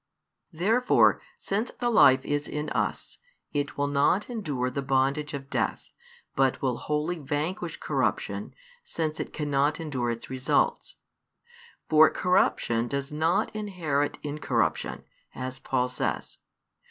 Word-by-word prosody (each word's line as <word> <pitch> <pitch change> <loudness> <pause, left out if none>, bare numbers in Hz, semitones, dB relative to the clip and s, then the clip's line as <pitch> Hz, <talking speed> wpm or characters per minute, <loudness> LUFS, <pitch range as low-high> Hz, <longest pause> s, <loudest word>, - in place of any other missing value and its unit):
Therefore, 220 +10 +3 0.2
since 210 +5 -1
the 240 -1 -2
life 130 - +6
is 145 0 -1
in 150 0 -4
us, - - -2 0.3
it 145 -1 -2
will 145 - +1
not 145 - +2
endure 145 - -2
the 140 - -2
bondage 135 +3 0
of 135 -1 -7
death, - - -2 0.4
but 135 -1 +2
will 130 -3 0
wholly 150 +3 -2
vanquish 160 +4 -3
corruption, - - -2 0.3
since 160 - -3
it - - -4
cannot 145 +1 0
endure 135 -7 -2
its 115 0 -4
results. 130 - 0 0.9
For 155 0 +7
corruption 120 -10 +1
does 140 +2 -3
not 160 +7 +1
inherit 170 -9 -1
incorruption, 125 - -1 0.3
as 130 0 -5
Paul 130 -1 0
says. 125 - -3
145 Hz, 125 wpm, -27 LUFS, 135-165 Hz, 0.9 s, For